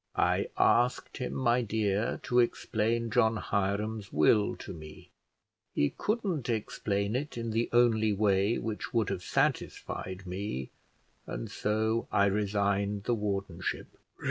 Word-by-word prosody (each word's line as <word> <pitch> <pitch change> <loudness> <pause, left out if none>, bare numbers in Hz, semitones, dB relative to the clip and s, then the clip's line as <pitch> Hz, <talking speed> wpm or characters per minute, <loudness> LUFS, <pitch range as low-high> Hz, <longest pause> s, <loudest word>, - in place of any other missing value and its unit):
"I - - +2
asked 120 +3 +2
him, 125 - -3
my 125 -1 +2
dear, 105 -2 0
to 125 - +2
explain 115 -1 +1
John 110 +1 +3
Hiram's 100 +1 -1
will 100 +8 +3
to - - -8
me. 75 -2 -11 0.6
He 70 - +2
couldn't 195 - -1
explain 105 -2 -1
it 140 0 -3
in 115 -1 -3
the 115 +2 0
only 115 -3 +4
way 100 +1 +2
which 110 +1 -4
would 115 -3 +2
have 90 - -3
satisfied 95 +1 -2
me, 90 -8 -4 0.6
and - - -5
so 110 +2 0
I 100 - +4
resigned 100 0 0
the 120 - +1
wardenship." 100 -5 -3
105 Hz, 130 wpm, -30 LUFS, 100-115 Hz, 0.6 s, only